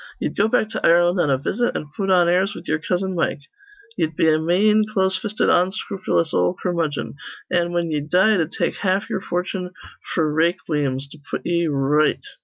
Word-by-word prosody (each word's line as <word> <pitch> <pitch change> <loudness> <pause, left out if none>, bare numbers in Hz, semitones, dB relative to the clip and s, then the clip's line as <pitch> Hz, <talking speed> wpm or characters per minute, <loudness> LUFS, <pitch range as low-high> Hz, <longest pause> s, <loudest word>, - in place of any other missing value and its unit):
Ye'd - - -3
go 205 - +2
back 220 -1 +1
to - - -4
Ireland 175 +2 +4
on 155 - +2
a 135 - +3
visit, 240 - -1
an' 150 - -8
put 195 -1 -2
on 180 -2 +4
airs 190 +4 +1
with - - -10
ye'er 155 - 0
cousin 185 +3 -2
Mike. 165 -4 -1 0.6
Ye'd 160 0 -1
be 160 - +2
a 155 0 +3
mane, 205 +7 +3
close 190 -2 +2
fisted, 210 +3 -1
onscrupulous 185 -2 0
ol' 180 - +1
curmudgeon; 165 -6 -2 0.3
an', 175 -1 +1
whin 170 -1 -1
ye'd 150 0 -3
die, 190 +6 +4
it'd 165 -6 0
take - - -2
haf 195 +2 -1
ye'er - - -2
fortune 180 +1 -3 0.5
f'r 155 -3 +1
rayqueems 150 -5 0
to 155 - -12
put - - -4
ye 170 -1 +1
r 150 - -1
right. 145 +3 +2
175 Hz, 200 wpm, -21 LUFS, 155-190 Hz, 0.6 s, Ireland